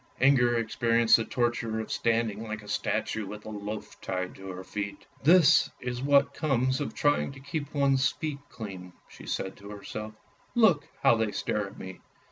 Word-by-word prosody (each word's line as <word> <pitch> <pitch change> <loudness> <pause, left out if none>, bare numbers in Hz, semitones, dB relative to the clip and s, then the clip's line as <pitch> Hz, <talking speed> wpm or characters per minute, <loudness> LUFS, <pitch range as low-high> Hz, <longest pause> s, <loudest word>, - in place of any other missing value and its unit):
Inger 120 -3 +4
experienced 115 0 +3
the 115 - -2
torture 120 -2 -1
of 110 - -5
standing 115 -2 0
like 110 -1 -5
a - - -13
statue 105 +1 -1
with 105 +2 -8
a 110 - -6
loaf 105 +1 -6
tied 90 -1 -3
to 95 0 -10
her 95 0 -6
feet. 100 +1 -5
" - - -28
This 180 -4 +6
is 125 0 -4
what 140 0 +4
comes 130 -3 +1
of 145 - -4
trying 145 -1 +2
to 135 - -12
keep 145 +1 -5
one's 135 -2 +3
feet 150 -3 -4
clean! 95 -5 -8
" - - -30 0.2
said 95 - -2
she - - -19
to 100 - -10
herself. 105 +1 -7 0.2
" - - -34
Look 205 -11 +4 0.2
how 135 -4 +6
they 110 -2 0
stare 105 -1 -2
at 100 - -13
me." 95 -1 -8
115 Hz, 195 wpm, -28 LUFS, 105-135 Hz, 0.2 s, This